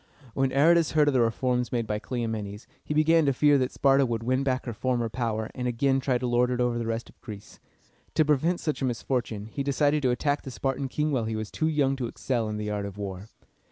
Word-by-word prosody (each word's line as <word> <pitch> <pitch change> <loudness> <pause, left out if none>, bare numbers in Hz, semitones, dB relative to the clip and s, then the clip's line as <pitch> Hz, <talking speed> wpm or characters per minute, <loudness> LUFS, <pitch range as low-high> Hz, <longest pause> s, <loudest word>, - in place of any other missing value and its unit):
When 135 -1 +1
Aratus 165 +4 +4
heard 150 -2 +4
of - - 0
the 130 - +3
reforms 125 +1 0
made 120 -2 0
by 105 -1 -2
Cleomenes, 110 -4 -4 0.2
he 150 - -3
began 160 +2 +4
to 140 - +3
fear 145 +1 +4
that 130 0 0
Sparta 135 0 +3
would 115 -3 -2
win 130 +3 +1
back 130 -1 -1
her 120 - -4
former 120 +1 -1
power, 110 -2 -2
and 125 -1 -3
again 135 +3 +1
try 130 -1 +1
to 125 - -4
lord 120 0 +2
it 125 -1 -1
over 120 -1 +1
the 115 - -3
rest 115 0 -3
of - - -20
Greece. 105 -3 -10 0.6
To 155 - +4
prevent 155 +4 +2
such 155 -2 -3
a - - +1
misfortune, 120 -3 -2
he 115 +6 -5
decided 145 +2 +1
to 130 - +2
attack 145 +4 0
the - - -8
Spartan 135 +1 -2
king 150 +3 -1
while 125 -5 0
he 110 0 -2
was 110 -1 -5
too 155 - 0
young 145 -4 +1
to 125 -3 -2
excel 115 -2 -2
in 105 - -3
the 105 0 -3
art 100 -1 -2
of 100 0 -10
war. 100 0 -6
125 Hz, 245 wpm, -27 LUFS, 115-140 Hz, 0.6 s, Aratus